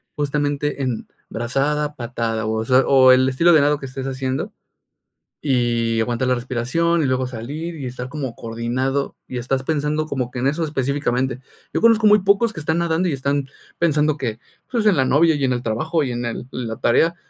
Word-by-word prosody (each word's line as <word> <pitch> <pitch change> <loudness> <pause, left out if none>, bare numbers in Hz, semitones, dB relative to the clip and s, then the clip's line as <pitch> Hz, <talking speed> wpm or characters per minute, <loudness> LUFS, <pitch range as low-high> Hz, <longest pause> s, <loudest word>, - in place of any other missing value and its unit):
justamente 145 0 -1
en 125 -4 -3 0.2
brazada, 145 +5 -1
patada, 115 -2 -3
o 110 0 -1
sea, 130 +2 +5
o 130 -1 +7
el 130 +1 +5
estilo 165 +7 +4
de 155 - +6
nado 145 0 +2
que 135 - -7
estés 130 +1 -6
haciendo, 130 0 -3 0.9
y 120 -4 +1
aguantar 120 +2 -1
la 125 - +3
respiración, 130 +8 0
y - - +1
luego 130 0 0
salir, 145 +8 -6
y 140 - -6
estar 125 0 -6
como 140 -5 -5
coordinado, 120 +4 -2
y 125 - -4
estás 130 +2 -1
pensando 150 +1 -1
como 130 -5 -2
que 125 - -8
en 130 - -1
eso 150 +4 0
específicamente. 130 -3 -1 0.3
Yo - - 0
conozco 225 -1 +5
muy 210 0 +6
pocos 200 +4 +2
que 165 - -7
están 160 +2 0
nadando 170 +1 +1
y - - -1
están 140 +1 -1 0.3
pensando 155 -2 +2
que, 120 -5 -3 0.3
pues, 230 -3 0
en 205 -4 +5
la 130 - +3
novia 160 +5 +4
y 145 - -2
en 130 - +1
el 120 0 -3
trabajo 155 +9 0
y 130 - -2
en 120 0 -3
el 115 - -3
en 125 -3 -4
la 110 - -5
tarea, 165 +8 +3
135 Hz, 200 wpm, -21 LUFS, 125-150 Hz, 0.9 s, o